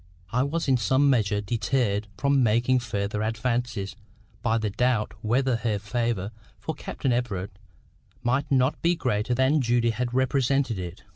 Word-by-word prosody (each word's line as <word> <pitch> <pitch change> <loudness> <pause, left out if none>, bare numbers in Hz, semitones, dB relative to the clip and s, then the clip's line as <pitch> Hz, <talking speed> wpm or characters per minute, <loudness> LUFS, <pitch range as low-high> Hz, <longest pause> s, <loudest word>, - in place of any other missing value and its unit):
—I 125 +2 +2
was 150 +5 -1
in 130 -2 +4
some 130 +6 +3
measure 105 -4 +1
deterred 110 -1 0
from 140 -1 +2
making 120 +3 +3
further 105 -3 -2
advances 115 -2 -2 0.5
by 115 -1 +1
the 110 -2 -1
doubt 120 0 +1
whether 125 +2 +1
her 110 -2 -1
favour 105 -1 -2 0.3
for - - -4
Captain 130 - -2
Everard 105 -6 -2 0.7
might 135 +4 0
not 130 +1 +2
be 170 +1 +3
greater 125 -4 0
than 135 +4 +3
Judy 120 -1 +2
had 120 +1 -2
represented 130 -2 +1
it. 90 -1 -7
120 Hz, 150 wpm, -26 LUFS, 105-130 Hz, 0.7 s, in